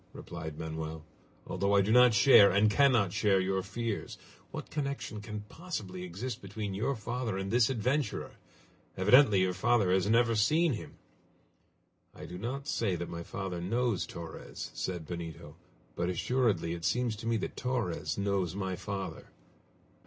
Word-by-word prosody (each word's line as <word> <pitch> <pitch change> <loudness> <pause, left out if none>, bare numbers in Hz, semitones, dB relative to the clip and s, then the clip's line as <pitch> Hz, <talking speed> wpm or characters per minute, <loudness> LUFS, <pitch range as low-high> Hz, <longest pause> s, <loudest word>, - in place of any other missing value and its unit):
replied 80 -3 -7
Manoel, 80 0 -5 0.4
"although 100 +2 0
I 100 - +6
do 100 +3 0
not 125 -1 +7
share, 105 -2 +8
and 105 +3 +3
cannot 120 -7 +4
share, 105 -3 +3
your 95 +1 0
fears! 105 +3 -4 0.3
What - - -7
connection 140 -7 -3
can 105 0 -6
possibly 105 - -6
exist 95 +8 -5
between 100 0 -5
your 115 +8 -1
father 115 -1 -3
and 95 0 -3
this 120 0 +4
adventurer? 130 +4 -1 0.7
Evidently 105 0 +6
your 95 0 +1
father 105 0 +2
has 95 +2 +2
never 115 0 +4
seen 155 +9 +3
him!" 110 - -7 1.2
"I - - -9
do 90 - -8
not 135 +7 -4
say 105 -10 0
that 85 0 -5
my 85 - -5
father 90 0 -5
knows 115 +2 0
Torres," 85 -1 -8
said 90 -4 -4
Benito; 85 -1 -7 0.4
"but 85 +1 -1
assuredly 95 -3 +1
it 85 -1 -7
seems 120 +3 +1
to 115 - -6
me 115 0 +2
that - - -4
Torres 110 -11 -2
knows 100 -3 0
my 95 -2 -2
father. 95 -4 -5
100 Hz, 155 wpm, -31 LUFS, 90-120 Hz, 1.2 s, share